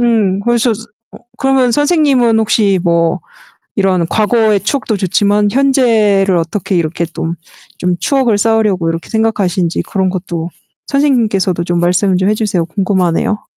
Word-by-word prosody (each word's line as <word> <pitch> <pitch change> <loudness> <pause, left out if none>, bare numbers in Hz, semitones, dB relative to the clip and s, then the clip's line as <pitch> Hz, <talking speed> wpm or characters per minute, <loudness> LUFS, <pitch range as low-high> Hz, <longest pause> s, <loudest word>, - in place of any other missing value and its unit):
음, 215 -5 +1
그래서 240 +2 +1 0.4
어, - - -12 0.2
그러면 265 -2 +2
선생님은 285 -6 +2
혹시 210 -3 +2
뭐 170 -2 +1 0.6
이런 185 -4 +1
과거의 215 0 +1
추억도 225 -1 -2
좋지만 205 +2 +1
현재를 220 -8 +2
어떻게 175 +3 -2
이렇게 170 0 -1
또 165 - -3 0.5
좀 180 -1 -1
추억을 260 -6 +1
쌓으려고 210 -5 +1
이렇게 165 0 -5
생각하시는지 195 -6 0
그런 190 -1 -1
것도 175 -2 -4 0.4
선생님께서도 220 - 0
좀 175 0 -1
말씀을 180 +2 +1
좀 190 +2 +1
해 - - +3
주세요. 200 -6 -1
궁금하네요. 185 +2 -1
205 Hz, 340 characters per minute, -13 LUFS, 180-230 Hz, 0.6 s, 해